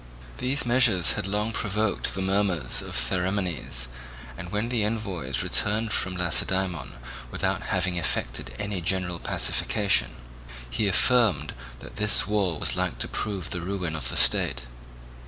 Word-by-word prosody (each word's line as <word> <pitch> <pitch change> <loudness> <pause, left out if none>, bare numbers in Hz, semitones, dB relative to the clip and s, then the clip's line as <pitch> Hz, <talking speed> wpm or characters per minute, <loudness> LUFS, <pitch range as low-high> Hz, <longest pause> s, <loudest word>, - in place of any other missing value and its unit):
These 135 +3 +1
measures 120 -7 +4
had - - -2
long 105 +3 -1
provoked 105 -1 -1
the 95 - -2
murmurs 95 -8 0
of - - -6
Theramenes, 90 -2 -1 0.5
and 90 +7 -8
when 105 +3 -1
the 120 -4 +1
envoys 95 - -2
returned 110 +2 +1
from 95 0 -1
Lacedaemon 90 0 0 0.4
without - - -1
having 90 -1 0
effected 60 -7 -2
any 105 -3 -3
general 90 -1 -1
pacification, 105 - +1 0.5
he 80 - -1
affirmed 100 - +3 0.3
that - - -11
this 105 0 +3
wall 100 -6 0
was - - +1
like - - -2
to - - -1
prove 95 -5 -2
the 90 - -3
ruin 90 -3 -3
of 80 - -2
the - - -3
state. - - +4
95 Hz, 140 wpm, -26 LUFS, 85-105 Hz, 0.5 s, measures